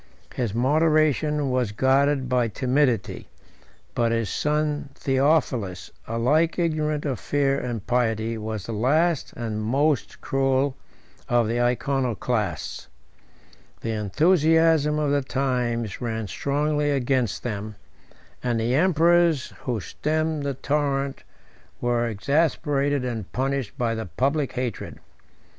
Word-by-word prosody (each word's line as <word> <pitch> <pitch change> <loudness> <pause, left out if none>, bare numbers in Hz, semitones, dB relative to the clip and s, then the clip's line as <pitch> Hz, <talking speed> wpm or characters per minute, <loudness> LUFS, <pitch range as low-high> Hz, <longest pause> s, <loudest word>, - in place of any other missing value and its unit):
His 115 -5 -2
moderation 150 +1 +2
was 125 -4 0
guarded 135 +3 +2
by 125 -2 +2
timidity; 125 -1 0 0.6
but 115 -1 +1
his 115 -2 -1
son 150 -1 -1
Theophilus, 135 - 0 0.2
alike 140 +9 +1
ignorant 155 -3 0
of 130 -7 -2
fear 140 +2 +1
and 115 -4 -4
pity, 115 -2 0
was 110 -2 -5
the - - -5
last 150 +8 +1
and 110 -2 -4
most 135 +5 0
cruel 135 0 +1 0.5
of 120 -2 +3
the 120 +2 0
Iconoclasts. 120 -4 -1 0.9
The 115 - -2
enthusiasm 155 - +3
of 150 -2 0
the 145 0 +2
times 125 -5 -2
ran 110 -3 -3
strongly 145 +5 0
against 130 -6 0
them; 105 -2 -4 0.7
and 120 -2 0
the 115 +2 0
emperors 170 -1 +3
who 120 -4 -1
stemmed 155 +6 -2
the 140 -1 -2
torrent 140 -1 -1 0.6
were 120 -1 +1
exasperated 140 - 0
and 115 -6 -4
punished 135 -2 -2
by 120 -3 0
the 110 -3 -4
public 135 - 0
hatred. 125 -4 -4
130 Hz, 115 wpm, -24 LUFS, 115-150 Hz, 0.9 s, of